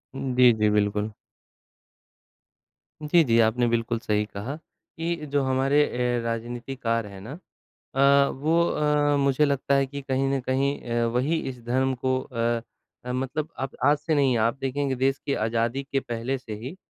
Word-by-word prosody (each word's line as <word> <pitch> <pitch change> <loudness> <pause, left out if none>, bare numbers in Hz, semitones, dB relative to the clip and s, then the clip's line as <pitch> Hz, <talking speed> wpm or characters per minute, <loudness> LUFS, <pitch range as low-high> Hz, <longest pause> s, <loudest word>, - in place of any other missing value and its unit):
जी, 125 -2 +4
जी 105 -1 +2
बिल्कुल। 105 +1 0 1.9
जी, 165 +3 +4
जी, 115 -4 +3
आपने 115 +2 +3
बिल्कुल 115 0 0
सही 105 -1 0
कहा 105 +7 -6
कि 165 +1 -6 0.2
जो 145 0 +2
हमारे 135 +2 +2
ए 125 0 0
राजनीतिकार 115 0 -3
है 100 -1 -10
ना। 115 - -9 0.6
अ, 140 +1 +5
वो 160 +5 +1
अ, 150 -1 +2
मुझे 140 +1 +3
लगता 140 -1 +1
है 140 0 +3
कि 140 +1 -7
कहीं 135 0 -1
न 135 - +1
कहीं 135 +2 0
अ, 120 0 +1
वही 130 +8 0
इस 125 -2 -9
धर्म 130 +2 +1
को 130 0 +1
अ, 115 -2 -1 0.5
मतलब 135 +5 -2
आप 135 0 -4
आज 145 +2 +5
से 155 +1 -1
नहीं 135 -4 +3
आप 115 +3 +1
देखेंगे 135 0 -1
देश 135 +2 +1
की 140 - 0
आज़ादी 115 +3 -1
के 135 - +2
पहले 120 +2 -3
से 120 -4 -8
ही, 125 - -7
130 Hz, 165 wpm, -25 LUFS, 115-140 Hz, 1.9 s, अ